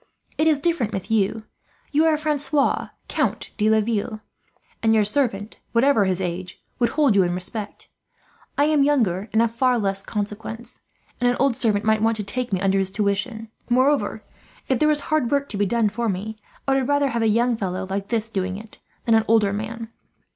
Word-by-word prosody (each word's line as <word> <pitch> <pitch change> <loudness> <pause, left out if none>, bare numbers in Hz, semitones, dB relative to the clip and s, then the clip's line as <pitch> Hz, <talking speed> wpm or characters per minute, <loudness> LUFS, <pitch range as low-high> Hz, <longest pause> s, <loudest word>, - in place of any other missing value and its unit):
It 310 - +2
is 310 -2 +4
different 290 -9 0
with 195 +2 -4
you. 215 0 +1 0.5
You 305 +2 +3
are 315 -1 +3
Francois, 295 -2 +1 0.2
Count - - -1
de 210 +1 +3
Laville; 215 0 0 0.6
and 225 -1 +3
your 215 -1 +4
servant, 210 -3 -1
whatever 235 -3 +4
his 185 -1 0
age, 180 0 -4 0.2
would 240 -2 +3
hold 285 -9 +4
you 195 - +6
in 175 -1 0
respect. 200 +4 -5 0.7
I 285 - +4
am 305 -1 +3
younger 220 -9 +1
and 220 +2 +3
of 230 -1 -1
far 250 +1 +2
less 195 -3 0
consequence, 215 +2 -5 0.4
and 245 -1 +3
an 245 - 0
old 275 -3 +3
servant 215 -3 +2
might 220 0 +3
want 225 0 +2
to 210 - -3
take 245 +4 -3
me 190 - +1
under 195 0 +2
his 190 -1 0
tuition. 210 +3 -2 0.2
Moreover, 260 +4 +2 0.4
if 260 -3 +1
there 305 - +4
is 300 -1 +2
hard 310 -6 0
work 280 +1 +1
to 205 - -5
be 205 0 +1
done 230 +1 +2
for 230 +2 -2
me, 205 +3 -3 0.3
I 270 - +3
would 270 -2 +1
rather 285 -1 +2
have 235 -2 -1
a 225 - +3
young 235 +3 +2
fellow 190 -3 -3
like 195 +1 -3
this 225 -2 0
doing 190 -3 -3
it 215 +1 -12 0.3
than 230 - +3
an 220 0 +4
older 215 -3 +3
man." 220 +2 -5
225 Hz, 200 wpm, -23 LUFS, 200-255 Hz, 0.7 s, you